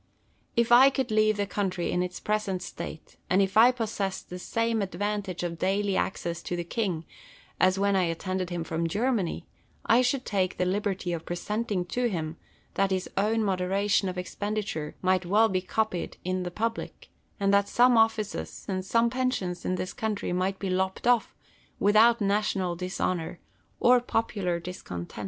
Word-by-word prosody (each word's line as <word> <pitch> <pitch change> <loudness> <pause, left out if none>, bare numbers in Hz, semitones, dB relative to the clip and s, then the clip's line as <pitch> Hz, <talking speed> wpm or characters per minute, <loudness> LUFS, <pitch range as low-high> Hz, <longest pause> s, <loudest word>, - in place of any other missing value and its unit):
If 235 0 +2
I 255 +3 +9
could 265 -3 -2
leave 215 0 +3
the 205 - 0
country 190 -3 -2
in 180 - +1
its 180 0 -4
present 205 -4 -1
state, 160 - -8
and 185 - +3
if 195 -1 +1
I 230 +3 +8
possessed 215 -7 -3
the 180 - -5
same 230 +3 0
advantage 195 0 -3
of 170 -1 -4
daily 195 +1 +1
access 170 -3 -2
to 175 - -3
the 175 - -2
king 175 -3 -2 0.5
as 185 +1 +4
when 200 0 +2
I 185 -2 +3
attended 185 +2 -2
him 175 -2 -3
from 165 0 -2
Germany, 215 -2 -1 0.4
I 230 +2 +5
should 255 +1 0
take 185 -3 0
the 180 - +1
liberty 190 -1 -1
of 165 - -3
representing 200 +2 -2
to 245 +6 0
him, 160 -4 -4 0.4
that 195 0 +1
his 190 -1 -2
own 220 +3 +1
moderation 195 +1 +1
of 180 - -6
expenditure 200 -4 -3
might 185 0 +3
well 210 +5 +4
be 185 -1 0
copied 190 -2 -2
in 185 0 -1
the 180 - -3
public, 225 +5 -4 0.3
and 200 0 +2
that 200 0 +3
some 245 0 +5
offices 225 -2 0
and 185 -1 -2
some 230 +4 +2
pensions 250 -9 -2
in 185 - 0
this 185 - -4
country 215 -4 -2
might 185 +2 0
be 190 -1 -3
lopped 190 +1 -1
off, 240 -2 +2 0.4
without 220 +3 +5
national 200 -3 0
dishonour 180 -1 -2 0.4
or 250 +1 +6
popular 205 -7 -1
dis 180 +2 -7
content. 85 +3 -7
195 Hz, 175 wpm, -27 LUFS, 180-220 Hz, 0.5 s, I